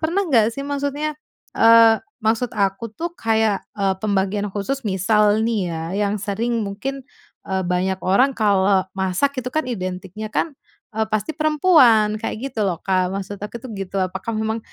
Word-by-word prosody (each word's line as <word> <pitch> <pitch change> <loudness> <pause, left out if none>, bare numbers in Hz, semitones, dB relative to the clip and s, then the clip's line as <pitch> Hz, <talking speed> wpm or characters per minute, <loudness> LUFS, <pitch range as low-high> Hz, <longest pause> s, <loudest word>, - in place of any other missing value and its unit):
pernah 345 +5 0
enggak 230 - +3
sih, 275 - -4
maksudnya, 285 +2 -2 0.4
eee, 225 0 +6 0.2
maksud 225 +1 0
aku 200 +2 -1
tuh 335 +9 -5
kayak, 220 - +1 0.2
eee, 195 -1 +1
pembagian 200 0 0
khusus. 210 +8 -3
Misal 210 +2 +2
nih 205 -7 -1
ya, 160 -1 -4 0.3
yang 200 - -1
sering 225 +4 -1
mungkin, 265 +8 -5 0.4
eee, 190 0 -1
banyak 185 +1 0
orang 200 +9 +3
kalau 200 -2 +3
masak 190 +9 0
itu 250 - -4
kan 310 - +2
identiknya, 185 +1 -5 0.7
eee, 220 0 0
pasti 215 +4 -1
perempuan, 300 -9 +4
kayak - - -3
gitu 225 -4 -2
loh, 175 -4 -1
Kak. 185 -1 +1
Maksud 195 +1 -5
aku 210 +3 -5
tuh 255 - -8
gitu. 195 0 -4
Apakah 190 +4 -4
memang, 220 +1 -1
215 Hz, 160 wpm, -21 LUFS, 195-240 Hz, 0.7 s, eee